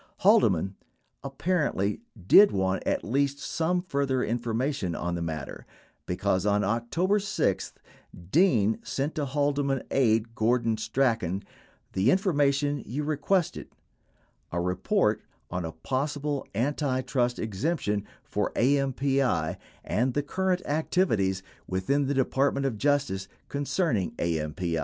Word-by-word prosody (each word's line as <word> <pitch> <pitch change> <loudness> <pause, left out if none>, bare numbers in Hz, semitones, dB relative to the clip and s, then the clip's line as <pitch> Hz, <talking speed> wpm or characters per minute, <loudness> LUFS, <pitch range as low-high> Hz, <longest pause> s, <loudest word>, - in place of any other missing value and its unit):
Haldeman, 95 - +4 0.5
apparently, 140 - -1 0.2
did 200 - +8
want 95 -1 0
at - - 0
least 140 +4 0
some 175 +5 -1
further 140 -6 0
information 120 - -1
on 85 0 -2
the 85 - -3
matter, 80 -3 -5 0.4
because 95 +1 0
on 105 0 +2
October 120 - +1
6, 205 - -1 0.6
Dean 120 - +3
sent 140 +3 -2
to 150 - -2
Haldeman 140 -1 0
aide, 115 -3 +2
Gordon 115 0 +1
Strachan, 110 -5 0 0.5
"the 95 +6 +2
information 145 -5 +2
you 135 +8 -4
requested" 155 +4 0 0.5
— - - -40
a 85 - -1
report 105 - +1 0.3
on 90 -1 -2
a 80 - -4
possible 140 - -2
antitrust 130 -1 0
exemption 105 - -1 0.2
for - - -2
AMPI 135 - +1 0.3
and 125 +2 0
the 145 - +1
"current 185 +4 -1
activities 110 - +1 0.2
within 135 +10 0
the 140 - 0
Department 135 +1 +1
of 115 -6 -2
Justice" 135 -9 +1 0.2
concerning 140 - 0
AMPI. 80 +1 -1
130 Hz, 115 wpm, -27 LUFS, 100-145 Hz, 0.6 s, did